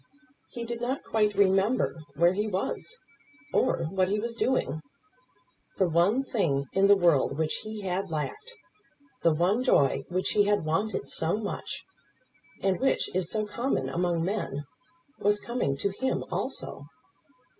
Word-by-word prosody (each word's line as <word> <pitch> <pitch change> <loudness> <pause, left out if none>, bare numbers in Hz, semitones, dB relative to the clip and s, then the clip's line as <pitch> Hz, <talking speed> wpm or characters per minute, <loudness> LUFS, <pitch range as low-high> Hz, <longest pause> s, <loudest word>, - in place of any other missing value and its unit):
He 235 - -6
did 235 0 -5
not 255 +3 -2
quite 210 -2 +1
remember 195 +4 +3 0.2
where 170 +4 +4
he 210 +3 -1
was, 210 - -3 0.6
or 210 - +2
what 185 -1 +2
he 205 +2 0
was 235 +2 -3
doing. 195 - 0 1.0
The 190 - +3
one 175 +10 +3
thing 160 - 0
in 195 +1 +4
the 205 - +8
world 165 -7 +3
which 155 -1 0
he 215 -1 -6
had 190 0 -2
lacked; 425 - -4 0.7
the 165 - +4
one 180 +10 +2
joy 140 - +3
which 185 +1 0
he 205 -1 +4
had 205 -5 +1
wanted 195 +7 -1
so 165 +5 0
much, 210 -2 -5 0.8
and 190 -1 +2
which 265 - +1
is 185 -2 0
so 215 -1 -1
common 210 - -1
among 170 +2 0
men, 185 -8 -2 0.6
was 205 +1 +2
coming 235 - -1
to 200 - 0
him 260 +7 -1
also. 145 - -4
195 Hz, 150 wpm, -28 LUFS, 170-220 Hz, 1.0 s, the